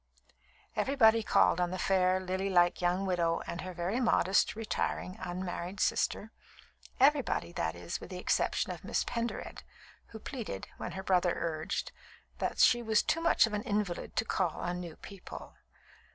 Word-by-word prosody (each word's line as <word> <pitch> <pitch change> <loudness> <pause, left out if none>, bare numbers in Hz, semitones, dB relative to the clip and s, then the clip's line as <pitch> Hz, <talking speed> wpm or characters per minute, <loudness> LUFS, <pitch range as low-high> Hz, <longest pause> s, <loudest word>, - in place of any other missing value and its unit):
Everybody 230 -5 +4
called 180 -4 +3
on 175 - +1
the 185 - -4
fair, 185 -1 +2
lilylike 185 -1 +1
young 180 +2 +1
widow 170 -3 +1
and 170 - -5
her 185 - -6
very 180 +6 -2
modest, 205 -6 +3
retiring, 210 -4 -2
unmarried 180 +1 -4
sister 220 - 0 0.7
everybody, 275 - +3
that 80 - -2
is, 85 0 -5
with - - -9
the 185 - -6
exception 180 - 0
of - - -8
Miss - - 0
Pendered, 235 -1 -4 0.5
who 225 - -10
pleaded, 220 - -6
when - - -5
her 190 - -5
brother 180 -2 +2
urged, 160 -2 -3 0.5
that - - -2
she 240 - +5
was 220 -2 +2
too 330 - 0
much 335 - +5
of 225 - -6
an 210 - -1
invalid 205 -6 -2
to 220 - +1
call 180 -6 -1
on 175 0 -3
new 170 -3 -7
people. 195 -2 -10
185 Hz, 160 wpm, -31 LUFS, 175-220 Hz, 0.7 s, she